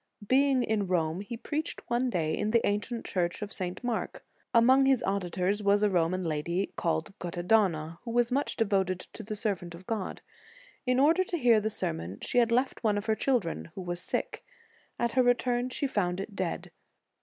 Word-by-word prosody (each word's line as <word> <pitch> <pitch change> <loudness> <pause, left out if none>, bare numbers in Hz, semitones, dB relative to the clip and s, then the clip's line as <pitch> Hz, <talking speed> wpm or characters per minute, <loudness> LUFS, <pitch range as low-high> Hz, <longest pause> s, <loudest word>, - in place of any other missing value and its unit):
Being 265 0 +4
in 210 -4 0
Rome, 170 -1 0
he 230 +3 -6
preached 305 +6 -4
one 245 +2 +1
day 160 -7 0
in 210 - -1
the 230 +1 +3
ancient 210 +3 -2
church 175 +2 -1
of 205 - -4
St. 185 +3 -4
Mark. 240 -2 -3 0.3
Among 260 +3 +5
his 265 -3 +3
auditors 190 +1 0
was 205 +1 +3
a 210 - +3
Roman 180 +1 +1
lady 170 +4 -2
called 165 +3 -1
Guttadona, 175 -2 +1
who 240 - -8
was 240 +1 +2
much 280 +3 0
devoted 195 -4 +1
to - - -10
the 215 0 -5
servant 190 -5 -3
of 180 +2 -13
God. 215 -3 -4 0.6
In 250 0 +3
order 325 +7 +5
to 350 - -2
hear 240 -6 +5
the 215 - 0
sermon, 165 - -3
she 245 - +2
had 230 -1 +3
left 250 +2 +1
one 210 -2 +2
of 205 - -3
her 220 - +2
children, 190 - 0
who - - -5
was 175 -1 -3
sick; - - -3 0.5
at 235 -1 0
her 260 - +3
return 245 0 +2
she 270 - -2
found 185 -8 0
it 200 +1 -6
dead. 185 -3 -3
205 Hz, 190 wpm, -29 LUFS, 180-240 Hz, 0.6 s, Among